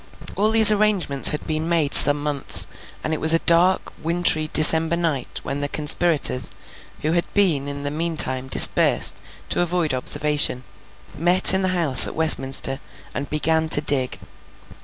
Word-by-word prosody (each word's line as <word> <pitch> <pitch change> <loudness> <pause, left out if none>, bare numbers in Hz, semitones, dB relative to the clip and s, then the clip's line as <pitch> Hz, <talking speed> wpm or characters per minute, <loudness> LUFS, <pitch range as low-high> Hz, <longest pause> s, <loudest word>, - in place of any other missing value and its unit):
All 210 +2 -2
these 220 -1 +7
arrangements 200 -10 -2
had 150 - -8
been 155 +1 -6
made 160 -4 -3
some 145 0 +5
months, 145 -2 -1 0.4
and 155 - -5
it 155 - -7
was 160 +1 +3
a 165 - -5
dark, 175 +2 -1
wintry, 165 -2 -2
December 160 +1 +1
night, 155 -7 -6
when 140 +1 -8
the 145 - -5
conspirators, 150 -5 +1 0.5
who 155 - -3
had 170 +1 -4
been 165 -9 0
in 140 0 -8
the 145 - -6
meantime 150 -5 -1
dispersed - - +3 0.3
to - - -3
avoid 175 -3 -4
observation, 145 0 0 0.5
met 175 +5 +2
in 190 - -1
the 190 - -3
house 150 -7 +6
at - - -11
Westminster, 135 -3 +1 0.3
and 140 - -8
began 160 +1 -3
to 145 - +5
dig. 140 -4 -4
155 Hz, 160 wpm, -18 LUFS, 145-170 Hz, 0.5 s, these